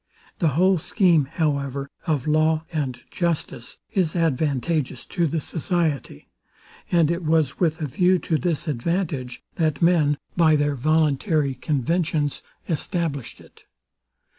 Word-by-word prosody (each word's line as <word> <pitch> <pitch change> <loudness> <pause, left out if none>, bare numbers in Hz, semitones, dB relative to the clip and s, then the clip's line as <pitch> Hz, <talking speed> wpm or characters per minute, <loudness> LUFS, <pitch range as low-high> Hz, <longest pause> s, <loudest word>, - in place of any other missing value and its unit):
The 170 - +3
whole 185 0 +4
scheme, 170 -4 +3
however, 140 -3 -1 0.2
of 150 -5 0
law 155 +1 +2
and 135 -6 -2
justice 165 -8 -2 0.2
is 180 -4 +1
advantageous 150 -3 0
to 175 -3 0
the 160 +2 -1
society; 160 - -2 0.6
and 170 -2 +4
it 170 +1 -2
was 155 -3 +1
with 160 -2 +1
a 155 - -2
view 180 +7 +3
to 160 -3 -1
this 170 -2 -1
advantage, 145 -2 -2
that 155 -3 +1
men, 165 -4 +3 0.2
by 160 -3 +5
their 145 0 +1
voluntary 155 - +1
conventions, 150 +2 -1 0.3
established 160 - -2
it. - - -18
155 Hz, 125 wpm, -23 LUFS, 140-170 Hz, 0.6 s, by